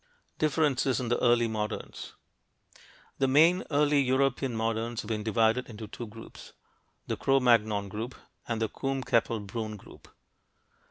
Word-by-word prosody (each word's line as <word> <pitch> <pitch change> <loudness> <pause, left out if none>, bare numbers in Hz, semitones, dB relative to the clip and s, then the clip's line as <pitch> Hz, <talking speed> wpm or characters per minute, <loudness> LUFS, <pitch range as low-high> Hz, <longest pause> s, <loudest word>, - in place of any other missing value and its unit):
DIFFERENCES 145 -4 +1
IN 125 -2 -3
THE 120 - +1
EARLY 120 -1 +4
MODERNS 110 -1 -5 1.0
The 135 - +3
main 165 +7 +5
early 145 -1 +3
European 130 -1 +1
moderns 115 +1 -1
have 105 - -9
been 110 -1 -1
divided 110 +3 +1
into 110 -1 -8
two 120 +3 -7
groups, 115 +2 -12 0.5
the - - -2
Cro 135 0 +2
Magnon 110 -5 +3
group 110 +5 -5 0.3
and 115 -2 -2
the 110 - +1
Combe 135 +3 -3
Capelle 115 -2 +1
Brünn 110 +1 -5
group. - - -16
120 Hz, 145 wpm, -29 LUFS, 110-135 Hz, 1.0 s, main